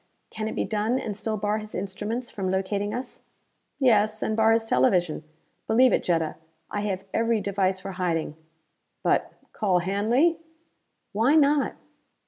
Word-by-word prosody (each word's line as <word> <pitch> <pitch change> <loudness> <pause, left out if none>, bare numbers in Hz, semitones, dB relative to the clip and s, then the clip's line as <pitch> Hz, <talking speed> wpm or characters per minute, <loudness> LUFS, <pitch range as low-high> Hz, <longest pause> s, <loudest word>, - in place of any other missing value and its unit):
Can 215 0 -4
it - - -4
be - - 0
done 215 +3 0
and 215 -5 -4
still 215 +1 -3
bar 210 +1 0
his 215 0 -9
instruments 210 +6 -4
from 190 -3 -3
locating 200 +2 -1
us?" 250 +3 -6 0.6
"Yes, 215 -5 +3
and 220 - 0
bar 220 0 +4
his 225 0 +2
television. 165 - +2 0.4
Believe 250 +3 +5
it, - - +3
Jetta. 165 -3 0 0.3
I 205 - -2
have 195 -2 -3
every 230 0 +2
device 195 -2 0
for 195 +1 -6
hiding. 170 -4 -2 0.7
But - - +1 0.2
call 190 -4 +1
Hanley!" 220 - +2 0.7
"Why 225 +8 +3
not? 290 -2 +3
210 Hz, 150 wpm, -26 LUFS, 190-225 Hz, 0.7 s, Believe